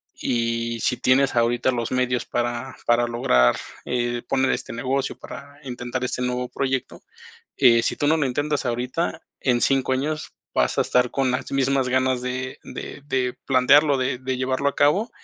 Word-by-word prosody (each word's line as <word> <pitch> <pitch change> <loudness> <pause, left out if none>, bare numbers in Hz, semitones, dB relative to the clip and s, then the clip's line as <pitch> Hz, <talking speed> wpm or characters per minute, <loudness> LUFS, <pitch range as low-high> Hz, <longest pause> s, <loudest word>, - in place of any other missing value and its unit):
y 115 0 -1
si - - +1
tienes 135 +2 +3
ahorita 120 +2 +2
los 120 -2 -3
medios 125 -1 0
para 120 +2 -3
para 120 0 +3
lograr, 65 - +3 0.3
eh, 120 -1 -1
poner 135 0 +2
este - - -3
negocio, 130 +3 -2
para 145 +1 -10
intentar 125 -1 -4
este 125 - -3
nuevo 125 0 -1
proyecto, 135 -1 -3 0.6
eh, 120 -4 +6
si - - 0
tú 145 - 0
no 160 - +4
lo 145 - +1
intentas 145 +2 -1
ahorita, 125 +7 -2 0.2
en 125 -3 +2
5 135 -1 +2
años 150 +4 -2 0.2
vas - - +1
a - - +5
estar 125 -1 +2
con 135 -2 +1
las 130 +2 -3
mismas 135 -1 +1
ganas 130 0 +1
de 130 +1 -4
de 145 - -8
de 130 -3 0
plantearlo, 140 +3 +5
de 130 0 -1
de 130 0 -3
llevarlo 130 +2 0
a 140 - -4
cabo, 185 +12 +3
130 Hz, 175 wpm, -23 LUFS, 120-135 Hz, 0.6 s, eh